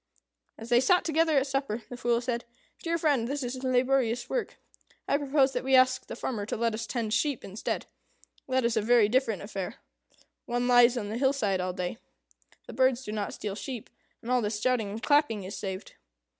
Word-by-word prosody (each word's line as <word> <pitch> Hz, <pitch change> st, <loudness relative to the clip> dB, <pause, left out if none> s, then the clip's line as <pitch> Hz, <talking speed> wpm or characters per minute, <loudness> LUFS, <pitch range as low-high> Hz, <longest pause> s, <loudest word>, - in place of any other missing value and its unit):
As 225 Hz, +1 st, -9 dB
they 240 Hz, 0 st, +5 dB
sat 355 Hz, +8 st, +4 dB
together 320 Hz, -1 st, +2 dB
at 270 Hz, -, +3 dB
supper, 270 Hz, -5 st, -2 dB
the 245 Hz, -, -8 dB
Fool 240 Hz, -1 st, +1 dB
said, 240 Hz, -1 st, -2 dB, 0.4 s
"Dear 335 Hz, 0 st, 0 dB
friend, 285 Hz, -8 st, +1 dB
this 280 Hz, +1 st, -3 dB
is 255 Hz, +1 st, -5 dB
laborious 255 Hz, -2 st, +1 dB
work. -, -, -3 dB, 0.5 s
I -, -, +2 dB
propose 275 Hz, -1 st, +2 dB
that -, -, -2 dB
we 265 Hz, 0 st, +3 dB
ask 255 Hz, 0 st, +4 dB
the -, -, -6 dB
farmer 210 Hz, -5 st, -3 dB
to -, -, -3 dB
let 230 Hz, 0 st, +1 dB
us 225 Hz, +1 st, -4 dB
tend 225 Hz, -4 st, -2 dB
sheep, 280 Hz, +2 st, 0 dB
instead. 195 Hz, +2 st, -4 dB, 0.6 s
That 260 Hz, -1 st, +2 dB
is 235 Hz, 0 st, +1 dB
a 220 Hz, -, +2 dB
very 230 Hz, 0 st, +5 dB
different 230 Hz, -5 st, +1 dB
affair. 195 Hz, -3 st, -5 dB, 0.7 s
One 245 Hz, +1 st, 0 dB
lies 245 Hz, 0 st, +6 dB
on 205 Hz, -3 st, -3 dB
the 225 Hz, +3 st, -3 dB
hillside 250 Hz, -9 st, +1 dB
all 180 Hz, 0 st, -2 dB
day. 180 Hz, -1 st, -4 dB, 0.7 s
The -, -, -9 dB
birds 260 Hz, -1 st, +2 dB
do 210 Hz, -, -6 dB
not 210 Hz, -1 st, -3 dB
steal 205 Hz, -2 st, -4 dB
sheep; 240 Hz, +2 st, -7 dB, 0.3 s
and 235 Hz, -, -4 dB
all 250 Hz, -1 st, +3 dB
this 210 Hz, -1 st, -2 dB
shouting 240 Hz, -2 st, +1 dB
and 215 Hz, +3 st, -6 dB
clapping 290 Hz, -9 st, +2 dB
is 190 Hz, +3 st, -6 dB
saved." 190 Hz, -1 st, -6 dB
245 Hz, 200 wpm, -28 LUFS, 220-265 Hz, 0.7 s, lies